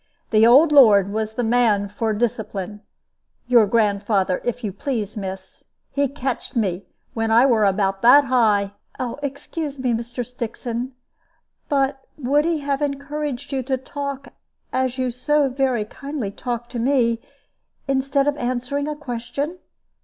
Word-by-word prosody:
The 220 +1 +6
old 285 +7 +7
lord 205 -8 +6
was 220 0 -2
the 245 - -1
man 225 -3 +2
for 220 +2 -2
discipline 210 -3 -3 0.6
your 235 -3 +5
grandfather, 200 -3 +1
if 245 0 -3
you 205 -3 -3
please, 215 -2 -3
miss. 190 -2 -7 0.3
He 285 0 +1
catched 265 -2 -4
me 195 -5 -1 0.3
when 225 -1 -1
I 230 +3 +6
were 230 -5 +3
about 195 0 +1
that 265 +5 +7
high 215 -6 +2 0.2
" - - -35 0.2
"Excuse 285 +1 -5
me, 255 -2 0
Mr. 235 +2 -3
Stixon; 240 +1 -5 0.8
but 275 -1 +1 0.2
would 290 +2 +2
he 330 -3 0
have 280 0 -1
encouraged 285 -1 -3
you 270 -1 -1
to 260 +1 -1
talk 280 +1 -6 0.4
as 260 0 0
you 255 -1 0
so 285 +4 +1
very 255 -4 0
kindly 275 -2 -5
talk 240 +2 -4
to 245 - -5
me, 235 -2 +2 0.7
instead 275 +1 +1
of 290 - +2
answering 255 +3 -2
a 300 - -3
question?" 280 +4 -4
245 Hz, 145 wpm, -22 LUFS, 220-275 Hz, 0.8 s, old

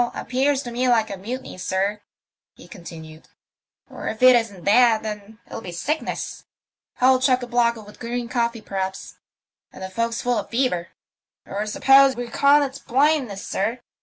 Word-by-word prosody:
Appears 270 +3 0
to 240 - -6
me 250 +2 0
like 225 -3 +2
a - - -3
mutiny, 235 +2 -7
sir," 195 +3 -1 0.5
he - - -15
continued. 165 -6 -11 0.3
" - - -59
Or - - -8
if 220 +3 -4
it 255 0 +9
isn't 215 -7 -1
that, 225 +1 +4
then 210 0 -7
it'll - - -8
be 180 - -7
sickness. 290 - -4 0.5
Hold 255 0 +4
chock 255 -1 +2
a - - -2
block 240 -1 +2
with 210 -2 -13
green 240 0 -4
coffee, 235 -1 -1
perhaps, 190 -1 -5 0.5
and - - -10
the 190 - -5
fo'ksle 230 +3 -2
full 245 -1 +1
of - - -7
fever. 230 -9 0 0.6
Or 205 +2 -4
suppose 270 +4 +5
you 245 - -3
reckon 280 +4 +4
it's 275 0 -5
blindness, 265 -6 0
sir? 230 +5 -2
235 Hz, 170 wpm, -23 LUFS, 205-255 Hz, 0.6 s, it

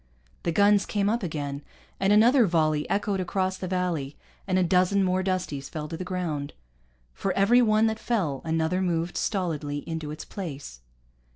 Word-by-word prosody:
The 170 - -1
guns 205 +3 +4
came 205 -1 0
up 235 - 0
again, 145 -5 -4 0.4
and 195 +1 +2
another 230 +3 +6
volley 155 -3 +1
echoed 200 -1 0
across 185 +1 -1
the 185 - -5
valley, 175 -6 -2 0.3
and 185 -1 +1
a 185 - +3
dozen 185 +3 +3
more 185 0 +1
Dusties 180 -7 -2
fell 150 -1 -5
to 165 - -4
the 180 - -5
ground. 170 -6 -3 0.6
For 195 - -2
every 225 +6 +4
one 215 -1 +4
that 220 0 0
fell, 175 - -1
another 165 +3 0
moved 170 -1 -1
stolidly 150 -7 -2
into 160 -2 -4
its 155 +1 -7
place. 145 - -7
180 Hz, 170 wpm, -26 LUFS, 155-195 Hz, 0.6 s, another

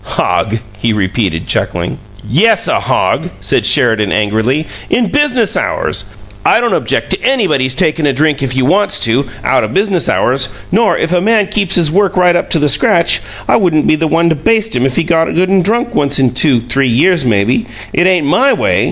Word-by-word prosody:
"Hog!" 110 - -1 0.2
he 115 +1 0
repeated, 95 -4 -2
chuckling. 85 0 -3 0.3
"Yes, 195 - +2
a - - +1
hog!" - - -1
said - - 0
Sheridan, 110 -4 +2
angrily. 110 +8 0 0.2
"In 235 -3 0
business 255 -7 +1
hours! 95 - -2 0.4
I - - +3
don't 240 0 0
object - - -2
to - - 0
anybody's 185 - 0
takin' 160 -2 0
a - - +2
drink 145 +1 0
if 130 -1 -3
you 130 -1 +1
wants 200 +8 +1
to, 125 +4 +1 0.2
out 130 - +1
o' - - -1
business 195 -3 -1
hours; 130 0 0 0.2
nor, 220 +3 +2
if 165 - -2
a 175 - +1
man 215 +1 +2
keeps 200 -3 -1
his 165 -4 +2
work 195 +1 0
right 180 -1 +3
up - - -1
to - - +1
the 150 -1 +1
scratch, 170 +4 +2 0.3
I - - +3
wouldn't 170 -7 +1
be - - +3
the 160 +1 -1
one 165 +2 +1
to 160 - +1
baste 220 +8 +1
him 125 +2 +1
if 130 - -4
he 170 - +1
got 165 -1 +1
good 185 +2 +1
an' 195 -1 +3
drunk 235 +6 -1
once 145 -1 +1
in 130 -3 +2
two, 125 -2 +2
three 125 +3 -1
years, 160 +8 +2
maybe. 115 +1 0 0.3
It 175 - +2
ain't 180 -5 +1
MY 265 - +2
way. - - 0
160 Hz, 205 wpm, -12 LUFS, 125-195 Hz, 0.4 s, I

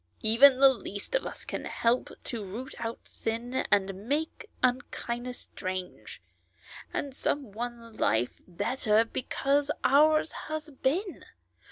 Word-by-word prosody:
Even 255 +5 +7
the 275 0 +9
least 205 - -6
of - - +1
us - - -7
can - - -4
help 235 +2 +1
to 230 -4 -4
root 225 +7 -7
out 230 0 -4
sin, 230 +2 -4 0.2
and 195 -1 +4
to 195 - -4
make 290 - -3
unkindness 245 -1 -1
strange, 185 0 -6 0.7
and 275 -2 -3
some 275 -6 -1
one 230 +1 -6
life 120 +2 +1
better 215 +4 +2
because 275 +4 0
ours 310 +3 +5 0.2
has 310 0 -4
been. 325 +9 -1
245 Hz, 130 wpm, -29 LUFS, 220-280 Hz, 0.7 s, the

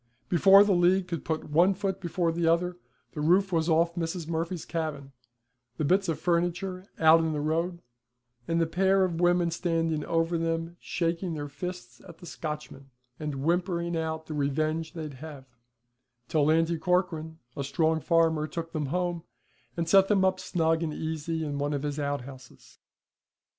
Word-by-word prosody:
Before 195 +3 +7
the 205 - +1
League 180 +1 +3
could 170 -4 -4
put 155 -1 -3
one 175 +5 +4
foot 195 -1 -2
before 175 -1 0
another 170 +2 +1 0.4
the 150 - -5
roof 185 +5 +3
was 165 -1 +1
off 170 +1 +3
Mrs. 165 -1 -3
Murphy's 165 +1 -3
cabin, 150 -5 -4 0.7
the 155 - -1
bits 185 +4 +2
of 160 - 0
furniture 175 +3 -1
out 160 +1 +6
in 160 -1 0
the 150 - -2
road, 165 +4 -1 0.6
and 165 0 +1
the 165 - +3
pair 190 +3 +2
of 170 -2 -3
women 175 -1 +3
standing 165 -2 -1
over 165 0 0
them 165 +1 -2
shaking 170 0 -2
their 145 -1 -4
fists 145 -4 -7
at 165 - -12
the 175 - -13
Scotchman, 150 -4 -7 0.3
and 145 -3 -4
whimpering 170 +1 0
out 160 -1 -3
the 155 - -6
revenge 155 +3 -1
they'd 155 -4 -6
have, 150 -4 -9 0.8
till 150 -2 +2
Lanty 165 +1 +2
Corcoran, 165 -3 0 0.2
a 140 - -3
strong 160 +3 +1
farmer, 160 -2 +2
took 165 +2 -6
them 150 -3 -2
home, 175 +1 -2 0.5
and 170 -1 -1
set 195 +2 +6
them 195 -2 +3
up 185 0 +1
snug 165 -3 0
and 155 -2 -2
easy 160 0 -3
in 145 -1 -3
one 145 +1 -1
of 140 - -3
his 145 0 -3
outhouses. 140 -2 -6
165 Hz, 170 wpm, -28 LUFS, 155-175 Hz, 0.8 s, Before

